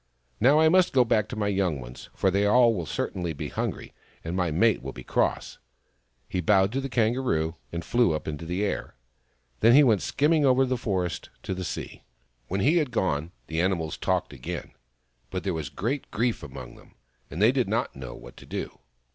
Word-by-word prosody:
Now 140 +6 +5
I 160 - +6
must 185 +2 +4
go 125 -2 +5
back 110 -2 +2
to - - -5
my 105 -1 -1
young 95 -7 0
ones, - - -10
for 95 - +2
they 100 +2 +2
will 115 -6 +4
certainly 85 -3 -3
be 70 - -5
hungry, - - -4 0.3
and 80 +2 -4
my 90 -2 +1
mate 105 +8 +2
will 65 +1 -6
be - - -9
cross." - - -1 0.7
He 90 - -2
bowed 95 +2 +3
to 135 +3 -1
the 135 - -4
Kangaroo, 110 -10 +1 0.2
and 85 -1 -5
flew 120 -6 +3
up 75 - -6
into 80 +1 -5
the 90 +4 -1
air. 100 - -3 0.6
Then 115 +3 +6
he 145 - +8
went 110 -7 +3
skimming 150 +2 +2
over 135 -1 +4
the 130 0 0
forest 95 -7 -2
to - - -3
the 95 0 -4
sea. - - -6 0.4
When 95 +2 -1
he 155 - +4
had 150 -5 +1
gone, 85 -8 -1
the 80 +1 -1
animals 85 -4 0
talked - - -1
again, 60 - -6 0.6
but 95 0 -4
there 95 - -1
was 80 -4 -4
great 115 - -3
grief 120 +1 -1
among 65 -5 -9
them, - - -19 0.3
and 80 - -6
they 110 +4 +6
did 130 -4 0
not 115 +3 -1
know 65 -3 -8
what - - -12
to - - -13
do. - - -5
100 Hz, 205 wpm, -26 LUFS, 80-125 Hz, 0.7 s, he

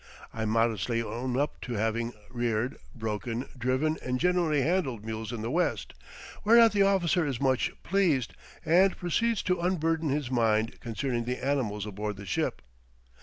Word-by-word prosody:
I 110 0 -3
modestly 115 +1 +1
own 125 +2 -3
up 145 +2 -1
to 125 - -5
having 115 +2 -1 0.2
reared, 120 0 -1 0.2
broken, 115 +2 -3
driven, 130 +6 0
and 125 0 -2
generally 170 -5 +2
handled 135 - 0
mules 110 0 -4
in 115 -3 -5
the 115 - -2
West, 175 +2 0 0.5
whereat 230 +1 +7
the 205 -1 +2
officer 190 -3 +3
is 135 -6 -2
much 130 -2 +1
pleased, 165 - +1 0.3
and 185 +4 +4
proceeds 225 +6 0
to 180 -1 +1
unburden 165 -3 0
his 140 -2 -1
mind 115 -2 +1
concerning 120 +1 -2
the 125 +1 -2
animals 115 -8 0
aboard 105 0 -4
the 100 - -8
ship. 95 - -2
130 Hz, 155 wpm, -28 LUFS, 115-165 Hz, 0.5 s, whereat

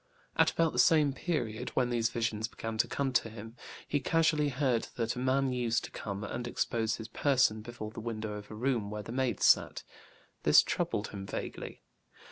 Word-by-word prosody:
At - - +5
about 165 -1 +1
the 125 - -1
same 145 +2 +5
period, 125 -7 -2
when 125 -2 +2
these 115 -1 +1
visions 115 -2 -1
began 115 -1 -6
to - - +3
come 135 -2 -1
to 115 - +2
him, 110 +1 -10 0.3
he 145 - +1
casually 160 -1 +2
heard 130 -4 0
that 115 -1 -1
a - - -4
man 130 +1 +1
used 120 -2 0
to - - -7
come 100 0 -5
and 120 +4 -4
expose 115 -2 0
his 110 - -7
person 125 -3 +2
before 110 -1 -7
the 110 - -8
window 110 -2 -4
of 105 0 -8
a 110 - -8
room 120 -3 0
where 105 0 -5
the 110 - -8
maids 125 -3 0
sat; - - +4 0.6
this - - +7
troubled 105 - -1
him 95 -1 -7
vaguely. - - -6
120 Hz, 195 wpm, -31 LUFS, 110-130 Hz, 0.6 s, this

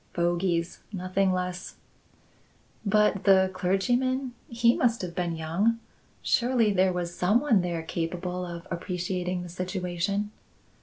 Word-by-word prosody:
"Fogies; 175 0 0
nothing 190 0 0
less." 180 0 -3 1.1
"But 210 -1 +3
the 190 -1 +5
clergyman? 245 +8 0 0.2
He 235 0 +3
must 235 -4 +1
have 175 -2 -4
been 175 -1 -1
young. 170 +9 +1 0.5
Surely 235 -4 +2
there 190 0 +3
was 175 -1 -3
some 200 +6 +3
one 245 -8 +3
there 170 -2 -2
capable 180 +2 -3
of 170 -1 -7
appreciating 180 +1 -2
the 175 - -8
situation?" 185 +3 -2
185 Hz, 120 wpm, -27 LUFS, 175-210 Hz, 1.1 s, the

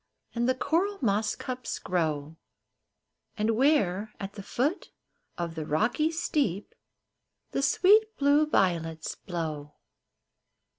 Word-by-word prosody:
And 240 +1 0
the 260 - +2
coral 345 +10 0
moss 210 -2 +1
cups 255 -2 -5
grow, 160 -3 -2 1.0
And 215 +1 +1
where, 220 - +2
at 195 0 -6
the 200 - -8
foot 280 - -1 0.5
of 170 -1 -3
the 160 -1 -4
rocky 230 - +1
steep, 280 - -1 0.8
The - - -1
sweet 425 +9 +4
blue 290 +2 +4
violets 165 - 0
blow. 155 -5 -5
215 Hz, 110 wpm, -28 LUFS, -, 1.0 s, sweet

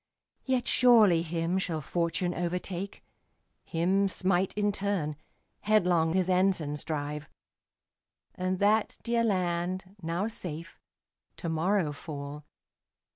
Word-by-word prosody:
Yet 260 -2 0
surely 220 -9 +6
him 170 +2 -1
shall 165 -4 -1
fortune 170 +4 -1
overtake, 180 +2 -3 0.6
Him 190 +4 +1
smite 185 0 +1
in 205 0 +2
turn, 195 -7 -1 0.4
headlong 180 -6 +3
his 185 -1 +2
ensigns 180 -6 +1
drive; 150 -1 -4 1.0
And 185 +1 -1
that 210 +3 +2
dear 235 0 +1
land, 185 -1 -1
now 170 +5 -1
safe, 165 -6 -7 0.6
to 170 - -4
morrow 165 +1 +1
fall. 145 0 -7
180 Hz, 105 wpm, -29 LUFS, 165-195 Hz, 1.0 s, surely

